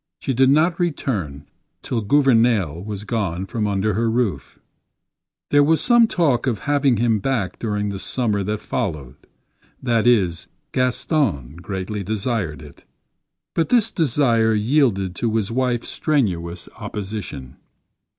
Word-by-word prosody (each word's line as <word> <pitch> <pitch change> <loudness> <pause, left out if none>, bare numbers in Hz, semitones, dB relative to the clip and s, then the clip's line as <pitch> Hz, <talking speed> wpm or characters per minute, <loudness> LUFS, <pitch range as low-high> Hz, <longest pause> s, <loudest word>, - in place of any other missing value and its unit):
She 135 - -2
did 130 +2 +4
not 160 +5 +3
return 105 - -2 0.4
till 120 -3 -2
Gouvernail 115 - +2
was 105 -1 -6
gone 95 -5 -2
from 105 +1 -2
under 100 +1 0
her 115 +3 0
roof. 110 - -2 0.9
There 145 0 +6
was 160 +2 +3
some 240 -1 +5
talk 140 - +1
of 120 -4 +1
having 140 -4 +2
him 115 -1 +2
back 110 -6 -2
during 105 -2 -2
the 100 -1 -5
summer 105 -2 -1
that 105 +1 -2
followed. 75 -9 -3 0.7
That 120 -2 +1
is, 95 -9 +2 0.2
Gaston 125 - 0
greatly 95 +3 -5
desired 100 - -2
it; 75 - -15 0.7
but 165 - 0
this 225 -3 +3
desire 120 -7 +2
yielded 105 -5 +1
to 115 -2 -1
his 110 -1 0
wife's 125 -1 -1
strenuous 90 - -1
opposition. 95 -11 -6
110 Hz, 130 wpm, -21 LUFS, 95-130 Hz, 0.9 s, There